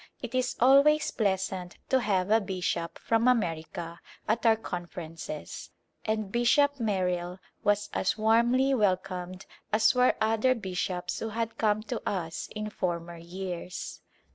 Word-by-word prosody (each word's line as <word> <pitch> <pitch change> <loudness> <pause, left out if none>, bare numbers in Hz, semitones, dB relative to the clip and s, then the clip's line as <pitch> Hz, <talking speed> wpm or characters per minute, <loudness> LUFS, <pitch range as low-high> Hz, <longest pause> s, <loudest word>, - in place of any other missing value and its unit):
It 245 -1 -7
is 255 0 0
always 280 +5 +5
pleasant 190 -3 -1
to 265 - +4
have 200 -4 0
a 225 +1 +5
bishop 180 -3 -2
from 230 +1 +1
America 170 -6 -1 0.3
at 225 +1 +1
our 225 - +6
Conferences 175 - -7 0.4
and 215 -2 -1
Bishop 280 +5 +3
Merrill 180 -4 -1 0.3
was 205 0 +2
as 190 - 0
warmly 235 +5 +3
welcomed 185 -4 -1 0.3
as 215 - +4
were 250 0 +4
other 225 +4 +3
bishops 180 -3 -3
who 225 - -3
had 230 +1 -3
come 215 -1 +2
to 215 - -4
us 165 -5 -4
in 215 0 -4
former 170 -3 -3
years. 180 +1 -6
205 Hz, 135 wpm, -29 LUFS, 180-230 Hz, 0.4 s, our